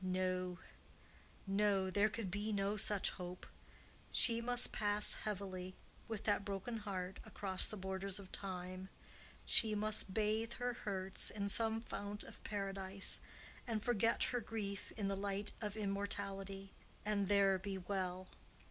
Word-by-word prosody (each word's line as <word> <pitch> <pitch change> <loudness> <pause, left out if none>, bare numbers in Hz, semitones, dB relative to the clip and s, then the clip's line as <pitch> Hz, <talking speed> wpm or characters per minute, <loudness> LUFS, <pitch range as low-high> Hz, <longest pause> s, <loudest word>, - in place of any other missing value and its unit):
No, 185 -1 0 0.9
no; 195 -1 +3
there 205 +3 +4
could 210 -3 -3
be 210 +3 -1
no 200 0 +1
such 205 -1 +3
hope. 180 -1 -6 0.7
She 230 -1 +5
must 245 +1 +5
pass 210 0 +3
heavily, 185 -3 -4 0.3
with 220 -3 -3
that 205 -1 +3
broken 200 +4 -3
heart, 190 -3 -3
across 190 -2 -1
the 215 - -4
borders 190 0 -2
of 195 -2 -9
Time—she 190 +3 -2
must 215 -2 +2
bathe 220 +3 +1
her 245 0 -1
hurts 195 -4 -1
in 200 -1 -2
some 225 +1 +3
fount 205 -2 -4
of - - -11
paradise, 195 -1 -1 0.5
and 220 -3 0
forget 230 -1 +3
her 245 - +1
grief 205 -3 -4
in 205 -2 0
the 195 - +1
light 200 +1 -1
of 210 -1 -3
immortality, 195 -1 -2 0.3
and 205 -2 +2
THERE 195 -1 +5
be 195 0 -3
well. 185 -1 -2
200 Hz, 140 wpm, -39 LUFS, 190-210 Hz, 0.9 s, She